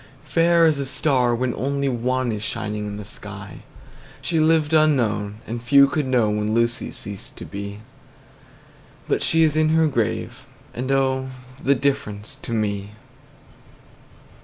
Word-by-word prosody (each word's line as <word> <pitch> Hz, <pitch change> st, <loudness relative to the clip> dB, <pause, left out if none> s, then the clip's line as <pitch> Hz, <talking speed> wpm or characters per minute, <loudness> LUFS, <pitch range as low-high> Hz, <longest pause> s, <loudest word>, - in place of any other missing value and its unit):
–Fair 165 Hz, +4 st, +3 dB
as 155 Hz, -3 st, +3 dB
a 140 Hz, -, -1 dB
star, 135 Hz, -4 st, +2 dB
when 125 Hz, 0 st, -1 dB
only 140 Hz, +1 st, -1 dB
one 130 Hz, 0 st, 0 dB
Is 105 Hz, -1 st, -4 dB
shining 105 Hz, -1 st, -3 dB
in 105 Hz, 0 st, -5 dB
the 105 Hz, -, -7 dB
sky. 105 Hz, -1 st, -9 dB, 0.6 s
She 165 Hz, -2 st, 0 dB
lived 155 Hz, -1 st, +3 dB
unknown, 115 Hz, -10 st, +2 dB
and 115 Hz, +1 st, -5 dB
few 140 Hz, +3 st, +6 dB
could 140 Hz, 0 st, -1 dB
know 120 Hz, -5 st, +2 dB
When 105 Hz, +1 st, -1 dB
Lucy 115 Hz, +1 st, +1 dB
ceased 100 Hz, -2 st, -8 dB
to -, -, -7 dB
be; 100 Hz, 0 st, -6 dB
10 105 Hz, -, -12 dB, 1.3 s
But -, -, 0 dB
she 165 Hz, 0 st, +4 dB
is 155 Hz, -2 st, +2 dB
in 155 Hz, 0 st, +3 dB
her 160 Hz, 0 st, +4 dB
grave, 120 Hz, -8 st, -2 dB, 0.3 s
and, 130 Hz, +3 st, -3 dB
oh, 130 Hz, -1 st, +1 dB, 0.3 s
The 140 Hz, -, +4 dB
difference 125 Hz, -7 st, -2 dB
to -, -, -6 dB
me! 105 Hz, -2 st, -2 dB
125 Hz, 155 wpm, -22 LUFS, 105-140 Hz, 1.3 s, few